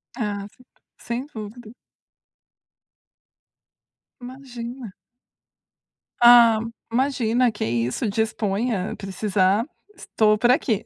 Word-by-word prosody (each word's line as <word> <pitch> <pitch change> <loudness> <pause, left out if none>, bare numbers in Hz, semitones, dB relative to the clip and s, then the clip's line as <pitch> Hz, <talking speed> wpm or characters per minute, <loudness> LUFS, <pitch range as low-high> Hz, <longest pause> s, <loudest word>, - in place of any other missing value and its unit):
Ah, 205 -4 -4
certo, 255 - -24 0.3
sem 240 +2 -5
dúvida. 220 -2 -10 2.5
Imagina. 245 -3 -9 1.3
Ah, 235 -2 +7 0.3
imagina, 245 -1 +1
que 205 - -5
é - - -1
isso. 120 - -1
Disponha. 215 -1 -2
Precisar, 195 +1 0 0.3
estou 215 -1 +1
por 240 +3 +3
aqui. 245 - +1
225 Hz, 85 wpm, -23 LUFS, 205-245 Hz, 2.5 s, Ah